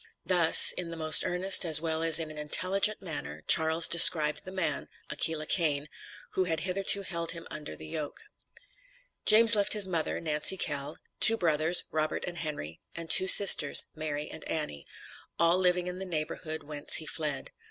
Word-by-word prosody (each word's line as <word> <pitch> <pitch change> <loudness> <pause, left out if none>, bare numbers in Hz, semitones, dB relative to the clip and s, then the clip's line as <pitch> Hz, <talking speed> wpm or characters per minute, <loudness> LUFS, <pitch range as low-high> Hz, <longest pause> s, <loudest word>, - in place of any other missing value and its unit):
Thus, 175 -3 +5
in 175 -2 -7
the 165 - -11
most 155 -1 +4
earnest, 185 +3 +2
as 160 -3 +5
well 160 0 -5
as 165 -1 +4
in 160 -1 -7
an 155 - -13
intelligent 195 +7 -1
manner, 165 -5 -9
Charles 160 +1 +3
described 160 -3 +4
the 185 - -11
man 185 -3 -5 0.2
(Aquila 160 -1 -1
Cain), 150 -4 -2 0.4
who 185 - -4
had 165 -2 -5
hitherto 195 +2 +1
held 170 -3 -6
him 170 -1 -13
under 150 - -10
the 80 - -14
yoke. 145 - -10 1.0
James 225 +1 +5
left 205 -1 -1
his 210 -3 0
mother, 165 -4 -5
Nancy 155 +3 -2
Kell, 145 -2 -4 0.2
two 225 - +6
brothers, 160 0 +3
Robert 155 0 -5
and 175 -1 -10
Henry, 145 - -9 0.2
and 165 -1 -7
two 185 - +5
sisters, 185 -7 +6
Mary 150 -1 -8
and - - -12
Annie; 150 - -8 0.5
all 170 +2 -1
living 180 -1 -2
in 180 0 -9
the 190 - -9
neighborhood 160 -1 -8
whence 145 0 -2
he 160 - -1
fled. 150 -2 -6
165 Hz, 175 wpm, -25 LUFS, 155-180 Hz, 1.0 s, two